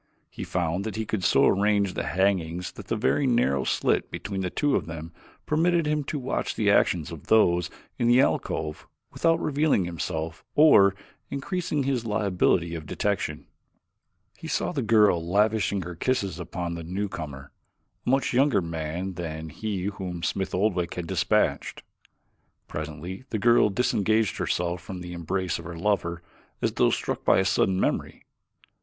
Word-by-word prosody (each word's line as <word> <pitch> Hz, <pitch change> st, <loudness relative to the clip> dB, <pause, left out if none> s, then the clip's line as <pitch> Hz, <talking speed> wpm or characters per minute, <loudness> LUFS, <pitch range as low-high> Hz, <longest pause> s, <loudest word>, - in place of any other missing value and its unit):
He -, -, -6 dB
found 90 Hz, +4 st, -2 dB
he 110 Hz, 0 st, -2 dB
could 105 Hz, -3 st, -2 dB
so -, -, +4 dB
arrange 100 Hz, -1 st, +2 dB
the -, -, -2 dB
hangings 90 Hz, 0 st, 0 dB
that -, -, -12 dB
a -, -, +3 dB
very 135 Hz, +5 st, +1 dB
narrow 95 Hz, -, +2 dB
slit -, -, +1 dB
between 95 Hz, -1 st, -4 dB
two 145 Hz, -2 st, +2 dB
of -, -, -1 dB
them 80 Hz, 0 st, -7 dB, 0.3 s
permitted 170 Hz, +2 st, +2 dB
him 150 Hz, 0 st, 0 dB
to 150 Hz, -, -3 dB
watch 130 Hz, -1 st, -2 dB
the -, -, +2 dB
actions -, -, +2 dB
of -, -, -10 dB
those 90 Hz, -6 st, +4 dB, 0.3 s
in 120 Hz, -, +2 dB
the 120 Hz, +1 st, +5 dB
alcove 80 Hz, -, -1 dB, 0.2 s
without 165 Hz, 0 st, +2 dB
revealing 145 Hz, -, +1 dB
himself 80 Hz, -1 st, -4 dB
or 100 Hz, -11 st, +6 dB, 0.3 s
increasing 155 Hz, +1 st, -2 dB
his 130 Hz, -3 st, 0 dB
liability 95 Hz, -5 st, +1 dB
of 80 Hz, -2 st, -6 dB
detection. 100 Hz, +4 st, -2 dB, 0.9 s
He -, -, -7 dB
saw -, -, -1 dB
the 150 Hz, -6 st, -2 dB
girl 105 Hz, -7 st, +4 dB
lavishing 100 Hz, +2 st, +1 dB
her 90 Hz, +1 st, -6 dB
kisses 95 Hz, -2 st, -1 dB
upon 85 Hz, 0 st, -4 dB
the 85 Hz, -, -5 dB
newcomer, 80 Hz, -7 st, -5 dB, 0.5 s
a -, -, -3 dB
much 135 Hz, +1 st, +2 dB
younger 135 Hz, -1 st, +4 dB
man 85 Hz, +2 st, -4 dB
than 80 Hz, -2 st, -5 dB
he 100 Hz, 0 st, -4 dB
whom 95 Hz, -4 st, -4 dB
Smith 95 Hz, -2 st, -1 dB
Oldwick 90 Hz, -3 st, 0 dB
had 90 Hz, -, -4 dB
dispatched. -, -, 0 dB, 0.8 s
Presently 80 Hz, -, -6 dB
the 110 Hz, -, -1 dB
girl 120 Hz, 0 st, +4 dB
disengaged 110 Hz, 0 st, +1 dB
herself 85 Hz, 0 st, -1 dB
from 95 Hz, 0 st, -7 dB
the 90 Hz, 0 st, -7 dB
embrace 90 Hz, +2 st, -2 dB
of 85 Hz, -, -10 dB
her 85 Hz, -1 st, -7 dB
lover 85 Hz, -3 st, -1 dB, 0.4 s
as -, -, 0 dB
though -, -, +3 dB
struck -, -, -2 dB
by -, -, +4 dB
a 95 Hz, -, +2 dB
sudden 95 Hz, 0 st, +2 dB
memory. -, -, -2 dB
95 Hz, 160 wpm, -26 LUFS, 85-110 Hz, 0.9 s, or